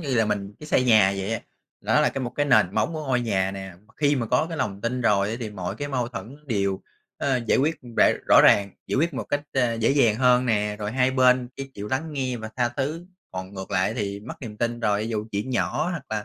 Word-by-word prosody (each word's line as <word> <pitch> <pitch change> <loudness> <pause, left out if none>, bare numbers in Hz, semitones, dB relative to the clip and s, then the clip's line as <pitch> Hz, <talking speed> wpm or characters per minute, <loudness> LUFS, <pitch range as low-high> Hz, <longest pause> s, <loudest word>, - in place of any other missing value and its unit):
như 140 -6 -2
là 110 -2 +3
mình 100 -1 -2
cái 150 - -9
xây 130 - +2
nhà 105 -5 +5
vậy 95 +3 -2
á. 115 - -2 0.4
Nó - - +2
là - - +3
một 125 -2 -3
cái 145 +4 -1
nền 110 -7 +4
móng 165 - +1
của 155 -1 -5
ngôi 125 -2 +1
nhà 95 -5 0
nè, 95 -1 -7
mà 110 - -25
khi 145 -1 +2
mà 120 -3 -1
có 125 +7 +2
cái 165 - -5
lòng 100 -1 -2
tin 125 +3 -2
rồi 100 -3 +2
á, 115 - -3
thì 110 -3 -4
mọi 95 -3 -5
cái 145 0 -4
mâu 125 -4 -1
thuẫn 120 +2 -8
đều, 100 -5 -1 0.4
ờ, 135 -3 0
giải - - +3
quyết 155 +4 +1 0.2
rõ - - +6 0.2
rõ - - +8
ràng, 100 -1 +5 0.2
giải - - -1
quyết 160 +3 +1
một - - -3
cách, 145 - -1
ờ, 125 -3 +1
dễ 115 +2 +1
dàng 135 -6 +4
hơn 125 0 +4
nè, 105 -2 0
rồi 105 +1 -4
hai 130 0 +2
bên 125 -1 +3
sẽ 135 - -4
chịu 105 +1 -6
lắng 155 +6 -2
nghe 130 -3 -2
và 110 -1 -7
tha 120 -1 +2
thứ. 145 +8 -4 0.2
Còn 95 +1 -7
ngược 95 0 -7
lại 95 +2 +1
thì 100 -3 -3
mất 110 - -8
niềm 110 -5 -8
tin 120 +1 -2
rồi 105 -2 +1
thì 110 - -3
dù 110 -2 -3
chuyện 105 +6 -2
nhỏ 130 +5 0
hoặc 170 -6 -4
là 105 -1 -2
120 Hz, 265 wpm, -24 LUFS, 105-130 Hz, 0.4 s, rõ